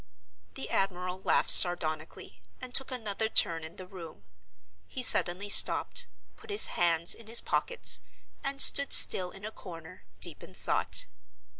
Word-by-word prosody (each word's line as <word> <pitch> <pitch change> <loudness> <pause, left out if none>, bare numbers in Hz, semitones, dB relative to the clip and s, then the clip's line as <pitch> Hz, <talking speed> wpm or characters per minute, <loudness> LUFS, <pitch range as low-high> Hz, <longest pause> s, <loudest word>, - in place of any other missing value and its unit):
The 135 - -10
admiral 185 -1 -6
laughed - - 0
sardonically, 160 -3 -1 0.2
and 255 -1 -12
took 270 - -1
another 220 -4 -7
turn 165 -6 -1
in 160 +1 -12
the 185 - -14
room. 180 -4 -16 0.6
He 255 - -8
suddenly 185 -3 0
stopped, 205 - +3 0.3
put 445 - -22
his 410 +1 +2
hands 170 -1 -1
in 230 - -13
his 230 +1 +3
pockets, - - -2 0.4
and 275 0 -6
stood 280 0 +6
still 180 -1 +6
in 195 +3 -15
a 215 - -9
corner, 175 -3 -16 0.2
deep - - -3
in - - -17
thought. - - -5
190 Hz, 150 wpm, -25 LUFS, 170-235 Hz, 0.6 s, stood